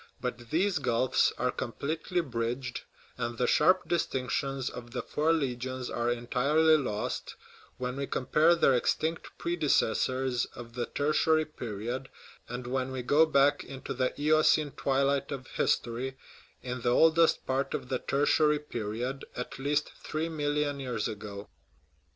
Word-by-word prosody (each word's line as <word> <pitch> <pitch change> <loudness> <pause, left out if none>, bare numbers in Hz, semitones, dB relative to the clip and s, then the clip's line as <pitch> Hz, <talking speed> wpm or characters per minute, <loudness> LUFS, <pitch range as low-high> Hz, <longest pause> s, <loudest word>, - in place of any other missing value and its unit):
But 120 0 -5
these 180 +1 +1
gulfs 130 -1 +2
are 125 - +1
completely 160 +8 -2
bridged, 125 -2 -3 0.4
and 120 0 -3
the 125 - +1
sharp 180 +6 +4
distinctions 135 -4 -1
of 120 -1 -6
the 125 -1 -4
four 155 +2 +1
legions 130 -4 -2
are 120 0 0
entirely 135 +7 +3
lost, 115 -8 -2 0.4
when 125 +1 -3
we 140 0 -2
compare 155 +6 +3
their 160 -5 +4
extinct 160 +6 0
predecessors 130 -6 +1
of 120 -1 -9
the 120 0 -3
Tertiary 155 +2 +2
period, 120 -1 -5 0.4
and 125 0 -5
when 130 +1 -2
we 130 -1 -4
go 150 +6 +5
back 145 -1 +3
into 135 -1 -6
the 130 +2 -1
Eocene 155 0 +4
twilight 140 +1 0
of 135 -2 -5
history, 125 +3 -1 0.5
in 125 -1 -4
the 120 - +1
oldest 160 +5 +4
part 135 +1 -1
of 125 - -5
the 130 - 0
Tertiary 150 +2 +3
period 125 -1 -4
at 125 +1 -6
least 145 +2 0
three 160 +2 -2
million 145 -2 -1
years 125 -5 -2
ago. 105 -1 -7
135 Hz, 140 wpm, -29 LUFS, 125-150 Hz, 0.5 s, go